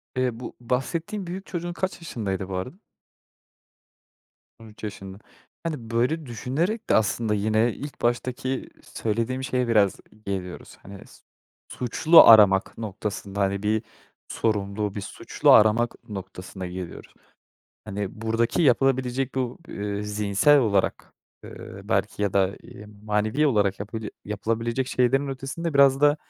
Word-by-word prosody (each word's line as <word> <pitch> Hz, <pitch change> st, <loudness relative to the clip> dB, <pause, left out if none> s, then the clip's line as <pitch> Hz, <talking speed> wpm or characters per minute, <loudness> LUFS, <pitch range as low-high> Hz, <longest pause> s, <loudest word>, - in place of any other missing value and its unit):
Eee, 125 Hz, -2 st, -1 dB
bu 125 Hz, -, -8 dB
bahsettiğin 165 Hz, -, -3 dB
büyük 185 Hz, +3 st, -6 dB
çocuğun 175 Hz, -1 st, -4 dB
kaç 190 Hz, 0 st, -3 dB
yaşındaydı 100 Hz, -, -4 dB
bu 95 Hz, -, -4 dB
arada? 95 Hz, -, -4 dB, 1.8 s
13 110 Hz, -1 st, -15 dB
yaşında. 95 Hz, -2 st, -7 dB, 0.5 s
Hani, 150 Hz, -9 st, -4 dB
böyle 135 Hz, +8 st, 0 dB
düşünerek 150 Hz, -, -2 dB
de -, -, +5 dB
aslında 110 Hz, 0 st, +1 dB
yine 110 Hz, +3 st, +1 dB
ilk 145 Hz, 0 st, -9 dB
baştaki 125 Hz, +2 st, -1 dB
söylediğim 115 Hz, +4 st, -2 dB
şeye 125 Hz, -2 st, 0 dB
biraz 105 Hz, -4 st, +3 dB, 0.3 s
geliyoruz. 95 Hz, -2 st, -5 dB
Hani, 100 Hz, 0 st, -11 dB
s -, -, -18 dB, 0.5 s
suçlu 155 Hz, +7 st, +6 dB
aramak 100 Hz, -4 st, +6 dB
noktasında, 105 Hz, -2 st, -5 dB
hani, 100 Hz, +1 st, 0 dB
bir 110 Hz, +2 st, +1 dB, 0.4 s
sorumlu, 105 Hz, -1 st, -1 dB
bir 100 Hz, -, -3 dB
suçlu 100 Hz, -, +1 dB
aramak 110 Hz, +2 st, +5 dB
noktasına 95 Hz, -1 st, -7 dB
geliyoruz. 90 Hz, -1 st, -8 dB, 0.7 s
Hani, 100 Hz, 0 st, -5 dB
buradaki 115 Hz, +8 st, +1 dB
yapılabilecek 130 Hz, -1 st, +2 dB
bu, 125 Hz, -2 st, -2 dB
ııı, 100 Hz, 0 st, -4 dB
zihinsel 105 Hz, +7 st, +3 dB
olarak, 100 Hz, -6 st, 0 dB, 0.3 s
ııı, 100 Hz, -, -10 dB
belki, 100 Hz, 0 st, 0 dB
ya 100 Hz, -, 0 dB
da, 95 Hz, 0 st, +1 dB
ııı, 105 Hz, -, -12 dB, 0.2 s
manevi 110 Hz, +8 st, +1 dB
olarak 100 Hz, -6 st, +1 dB
yapabi 110 Hz, 0 st, -5 dB
yapılabilecek 115 Hz, +5 st, -2 dB
şeylerin 135 Hz, +3 st, +2 dB
ötesinde 135 Hz, +4 st, -4 dB
biraz 140 Hz, -1 st, +5 dB
da, 145 Hz, +1 st, +5 dB
115 Hz, 130 wpm, -25 LUFS, 100-130 Hz, 1.8 s, suçlu